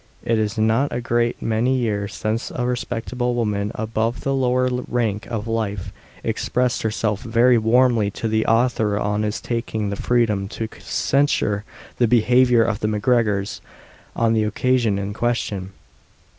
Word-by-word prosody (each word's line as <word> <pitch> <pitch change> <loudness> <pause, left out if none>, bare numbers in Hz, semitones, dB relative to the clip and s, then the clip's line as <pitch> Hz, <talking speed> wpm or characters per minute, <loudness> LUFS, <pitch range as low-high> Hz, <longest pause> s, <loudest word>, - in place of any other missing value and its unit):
It 115 -1 +2
is 105 -1 -1
not 110 +6 +2
a - - -2
great 120 0 0
many 115 +4 +1
years 105 -4 -2
since 110 +1 -2
a 125 - -3
respectable 125 0 -2
woman, 105 -3 -1
above 110 +2 -2
the 135 - -1
lower 130 -1 +2 0.2
rank 110 -4 -1
of 110 -1 -4
life, 105 -4 -3 0.3
expressed 125 0 0
herself 105 -1 -1
very 120 +1 +3
warmly 115 -1 +3
to 115 - -2
the 110 0 0
author 115 -3 +2
on 105 0 0
his 105 -1 -2
taking 110 -3 -3
the - - -2
freedom 105 -4 +1
to 110 +2 -4
censure 120 -7 0 0.3
the 120 - +4
behaviour 120 +1 +4
of 110 -2 -1
the 105 - -1
MacGregors 105 -2 0 0.5
on 115 -1 +2
the 110 - +2
occasion 115 0 +1
in 100 +1 -3
question. 105 -5 -2
115 Hz, 150 wpm, -22 LUFS, 105-120 Hz, 0.5 s, the